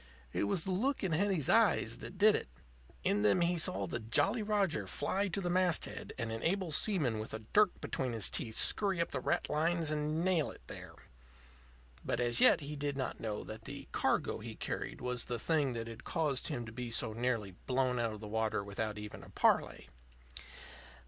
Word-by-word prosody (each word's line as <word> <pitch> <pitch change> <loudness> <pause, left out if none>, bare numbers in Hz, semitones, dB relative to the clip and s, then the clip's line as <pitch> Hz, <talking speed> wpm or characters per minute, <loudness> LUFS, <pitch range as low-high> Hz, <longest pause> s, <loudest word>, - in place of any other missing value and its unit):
It - - +1
was 130 - +1
the 190 - -3
look 250 +9 0
in 190 - 0
Hetty's 175 -3 +1
eyes 215 - +3
that 190 - -9
did 210 +2 +6
it. - - -2 0.6
In 105 - +2
them 105 - +4
he 175 0 +2
saw 100 -10 +1
the 105 +6 -3
Jolly 160 - +3
Roger 205 -6 0
fly 200 +1 0
to 190 +1 -2
the 180 - -2
masthead 180 -2 +1
and 115 -3 -2
an 115 0 -4
able 185 0 0
seaman 150 - +2
with 110 0 -4
a - - -5
dirk 210 -3 +4
between 130 -3 -2
his 110 -3 +1
teeth 110 -2 -2
scurry 195 -4 +2
up 170 - 0
the 130 - -2
ratlines 160 +3 0
and 155 +2 -1
nail 175 -5 +2
it - - -12
there. - - -9 1.1
But 120 - -1
as 120 -1 +1
yet - - +6
he 145 +1 -5
did 145 -1 -3
not 130 - -3
know 105 -2 -3
that 110 +1 -9
the - - -7
cargo - - 0
he - - -7
carried - - -4
was 125 -1 0
the 120 - -3
thing 145 +1 +1
that 115 -1 -4
had 115 -1 -9
caused 150 -6 -1
him 120 -7 -3
to 110 - -8
be 125 +1 -5
so 115 -1 +1
nearly 115 -4 -1 0.2
blown 130 -1 +1
out 115 -2 0
of 105 - -9
the 105 - -6
water 110 -1 -1
without 105 +1 -3
even 105 0 -7
a - - -13
parley. - - +1
135 Hz, 200 wpm, -34 LUFS, 115-175 Hz, 1.1 s, did